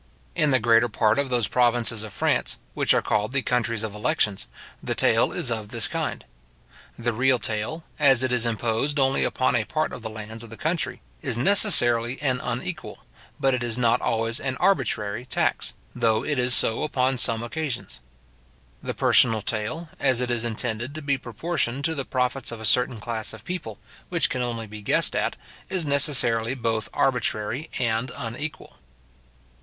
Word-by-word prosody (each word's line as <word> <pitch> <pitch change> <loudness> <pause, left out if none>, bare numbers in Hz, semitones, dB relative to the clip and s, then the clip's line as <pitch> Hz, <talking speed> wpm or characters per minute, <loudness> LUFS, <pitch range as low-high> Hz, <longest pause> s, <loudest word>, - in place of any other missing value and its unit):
In 150 - +1
the 130 - +4
greater 115 0 +4
part 110 +2 +2
of 140 -1 -1
those 120 -4 +1
provinces 120 -3 +2
of 110 -1 -7
France, - - 0 0.2
which - - +1
are - - +3
called 105 +4 0
the 135 -2 +1
countries 115 -3 -1
of 110 -2 -4
elections, 105 -1 0 0.3
the - - -3
taille - - +3
is - - 0
of 110 -2 -3
this 115 0 0
kind. - - -4 0.7
The 120 0 -1
real 130 +3 +3
taille, 115 +9 -3 0.2
as 135 -4 +4
it 130 - 0
is 120 -2 +2
imposed 115 +5 -1
only 135 0 +2
upon 130 -1 +1
a 115 - +2
part 155 +7 -2
of - - -7
the 110 - -5
lands 110 +1 -8
of 115 - -11
the 115 - -11
country, 165 +1 -2 0.2
is 130 -6 -1
necessarily 120 - +4
an 130 -3 0
unequal, - - -5 0.3
but 135 -1 +2
it 125 - -1
is 120 -1 -2
not 120 -2 +2
always 115 +2 0
an 130 -1 -3
arbitrary 110 - 0
tax, 125 - -1 0.2
though 115 -3 +1
it 145 -4 -1
is 125 0 +4
so 110 - +3
upon 130 -3 0
some 115 -1 +1
occasions. 125 - -5 0.8
The - - -4
personal 110 -4 +4
taille, 115 +11 -3
as 130 -3 +2
it 125 -1 -1
is 120 -1 -1
intended 120 +3 -2
to 155 - -6
be 140 -2 0
proportioned 140 +1 -2
to 160 - +1
the 140 -4 -4
profits 125 0 -1
of 115 - -7
a 110 - -6
certain 125 +2 +3
class 110 0 -3
of - - -12
people, 155 - -5 0.3
which - - 0
can 130 - -2
only 115 -2 -3
be 105 0 -10
guessed - - +2
at, - - 0 0.3
is 185 -4 -1
necessarily 130 -5 +4
both 115 -3 -2
arbitrary 125 +2 0
and 120 +1 -1
unequal. 140 +5 -6
120 Hz, 180 wpm, -24 LUFS, 110-135 Hz, 0.8 s, the